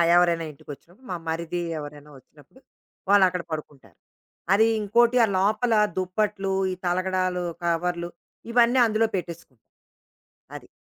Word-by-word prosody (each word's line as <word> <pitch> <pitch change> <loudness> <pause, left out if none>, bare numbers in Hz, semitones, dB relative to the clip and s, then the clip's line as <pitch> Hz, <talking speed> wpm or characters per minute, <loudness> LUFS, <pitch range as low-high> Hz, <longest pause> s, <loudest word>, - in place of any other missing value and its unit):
ఎవరైనా 170 -2 +3
ఇంటికొచ్చినప్పుడు, 165 - -14
మా 180 - -2
మరిది 170 +2 -3 0.2
ఎవరైనా 145 0 -10
వచ్చినప్పుడు 145 - -21 0.5
వాళ్ళక్కడ 185 -3 +4
పడుకుంటారు. 150 -3 -8 0.6
అది 215 +3 +5 0.2
ఇంకోటి 235 +4 +3
ఆ - - -5
లోపల 215 +4 +1 0.2
దుప్పట్లు, 195 +1 -1 0.2
ఈ - - -2
తలగడాలు, 185 0 0 0.2
కవర్లు, 170 0 -1 0.4
ఇవన్నీ 240 +2 +4
అందులో 225 0 +1
పెట్టేసుకుని. 170 - -7 0.9
అది. - - -10
180 Hz, 110 wpm, -25 LUFS, 165-210 Hz, 0.9 s, అది